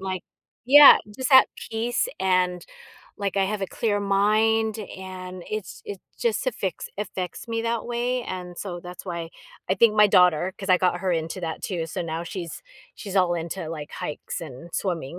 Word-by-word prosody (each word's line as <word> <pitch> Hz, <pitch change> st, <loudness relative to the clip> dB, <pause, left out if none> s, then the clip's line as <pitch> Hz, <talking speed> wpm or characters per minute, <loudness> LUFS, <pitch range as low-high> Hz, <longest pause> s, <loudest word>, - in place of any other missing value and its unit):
Like, 190 Hz, -1 st, -4 dB, 0.4 s
yeah, 285 Hz, +3 st, +10 dB, 0.2 s
just 260 Hz, +1 st, -2 dB
at 260 Hz, -, +8 dB, 0.2 s
peace 235 Hz, -, 0 dB
and 180 Hz, -2 st, +1 dB, 0.5 s
like 200 Hz, -1 st, -2 dB
I 195 Hz, -, +3 dB
have 205 Hz, +1 st, -2 dB
a 195 Hz, -, -1 dB
clear 205 Hz, +1 st, -1 dB
mind 215 Hz, +2 st, +2 dB
and 185 Hz, -3 st, -8 dB
it's 215 Hz, -4 st, -5 dB
it's 200 Hz, -2 st, -7 dB, 0.2 s
just 235 Hz, +2 st, 0 dB
affects 200 Hz, -6 st, -3 dB
affects 190 Hz, 0 st, -5 dB
me 230 Hz, 0 st, -2 dB
that 230 Hz, 0 st, -1 dB
way 245 Hz, +1 st, -1 dB
and 180 Hz, -4 st, -6 dB
so 175 Hz, -2 st, -5 dB
that's 180 Hz, 0 st, -9 dB
why 170 Hz, -3 st, -5 dB, 0.4 s
I 190 Hz, -, +3 dB
think 215 Hz, +2 st, +4 dB
my 210 Hz, 0 st, +7 dB
daughter 180 Hz, -2 st, +4 dB
'cause 195 Hz, -1 st, -4 dB
I 180 Hz, -, +6 dB
got 180 Hz, -1 st, +1 dB
her 185 Hz, -1 st, 0 dB
into 165 Hz, +2 st, -2 dB
that 165 Hz, -2 st, -4 dB
too, 175 Hz, -4 st, -2 dB
so -, -, -5 dB
now 165 Hz, 0 st, -4 dB
she's 170 Hz, -2 st, -6 dB, 0.3 s
she's 195 Hz, -3 st, -8 dB
all 180 Hz, -2 st, +3 dB
into 170 Hz, 0 st, -4 dB
like 155 Hz, -2 st, -6 dB
hikes 150 Hz, -, -5 dB
and 155 Hz, +1 st, -9 dB
swimming. 170 Hz, -4 st, -3 dB
190 Hz, 180 wpm, -25 LUFS, 175-215 Hz, 0.5 s, yeah